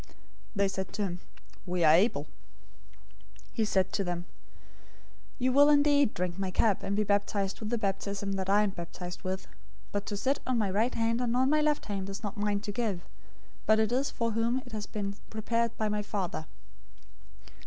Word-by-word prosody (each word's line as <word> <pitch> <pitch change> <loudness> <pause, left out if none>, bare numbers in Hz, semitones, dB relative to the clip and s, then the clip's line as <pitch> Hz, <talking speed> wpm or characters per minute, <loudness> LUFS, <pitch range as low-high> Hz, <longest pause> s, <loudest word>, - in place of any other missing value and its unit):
They 200 0 +3
said 190 0 -4
to 210 - -1
him, 180 -2 -3 0.5
"We 180 -1 0
are 155 -1 +7
able." 195 +8 +4
020:023 - - -19 1.3
He 225 - +1
said 190 -3 +1
to 200 - +1
them, 175 -1 -3 1.1
"You 255 -1 +1
will 285 +2 +7
indeed 285 -3 +4
drink 180 +1 -2
my 190 -1 -1
cup, 200 +2 +2
and 200 - -1
be 210 - +2
baptized 200 -1 0
with 215 - -4
the 240 - +1
baptism 200 -1 -2
that 190 -1 -2
I 205 +2 +5
am 205 - 0
baptized 175 0 -7
with, 190 0 -3 0.5
but 205 0 -2
to 205 - -2
sit 270 +7 +1
on 255 -1 +2
my 205 -4 +1
right 220 +6 +1
hand 230 +1 +1
and 245 0 +1
on 260 +2 +3
my 305 0 +4
left 300 -1 +1
hand 195 -2 -3
is 195 +3 -6
not 205 -1 -3
mine 205 -1 0
to 210 -1 -4
give; 205 -5 -2 0.6
but 215 +1 +6
it 220 0 +2
is 265 +3 +1
for 230 -1 -1
whom 230 +4 0
it 250 - -12
has 215 -2 -4
been 200 -1 -4
prepared 230 +1 -1
by 215 - 0
my 210 0 0
Father." 190 -6 -3
205 Hz, 195 wpm, -30 LUFS, 195-230 Hz, 1.3 s, are